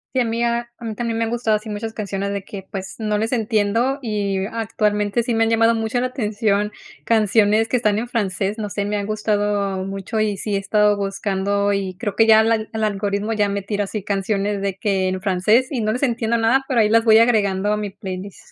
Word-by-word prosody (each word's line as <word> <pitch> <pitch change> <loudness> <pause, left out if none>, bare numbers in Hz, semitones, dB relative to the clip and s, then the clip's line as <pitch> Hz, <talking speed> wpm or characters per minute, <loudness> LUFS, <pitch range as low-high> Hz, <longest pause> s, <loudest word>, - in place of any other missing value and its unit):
Sí, 260 - +3
a - - +1
mí 230 +1 -2
a 235 0 -1
a 240 - -8
mí 220 -1 -4
también 230 0 -2
me 230 - +1
han - - -3
gustado 230 -2 +1
así 215 +1 -10
muchas 215 +1 -4
canciones 200 -2 -3
de 200 -1 -3
que, 195 0 -8
pues, 190 -1 -6
no 215 -2 -1
les 220 +2 -1
entiendo, 225 +3 +1
y 200 -5 -1
actualmente 210 0 0
sí 235 +1 -2
me 225 0 +3
han 225 - +1
llamado 225 0 +3
mucho 225 +2 -1
la 255 - 0
atención 210 -4 -1 0.3
canciones 220 0 +3
que 250 - -1
están 215 -3 +1
en 240 - -4
francés, 200 -3 -2
no 210 -2 -4
sé, 200 0 -2
me 210 +1 -2
han 205 -1 -2
gustado 205 -2 -1
mucho, 195 +3 -4
y 210 -2 0
sí 205 +1 -2
he - - +1
estado 210 +1 +2
buscando, 200 0 -1
y 195 -2 -2
creo 205 -1 -3
que 225 - +5
ya 220 -1 +7
el 225 +1 +2
al 220 -1 0
el 220 0 -2
algoritmo 205 +1 -1
ya 210 -2 +1
me 200 0 -2
tira 205 +1 -2
así, 205 0 -5
canciones 200 0 -1
de 195 -1 -2
que 195 -3 0
en 185 0 -3
francés 210 +6 +2
y 255 -5 -1
no 215 0 0
les 250 +5 -2
entiendo 235 -3 +1
nada, 230 +4 +3
pero 255 -3 +1
ahí 215 -1 +4
las 230 +1 +4
voy 220 -1 +6
agregando 210 -4 +2
a - - 0
mi 210 -1 -3
playlist. 195 -1 -7
210 Hz, 240 wpm, -21 LUFS, 200-225 Hz, 0.3 s, ya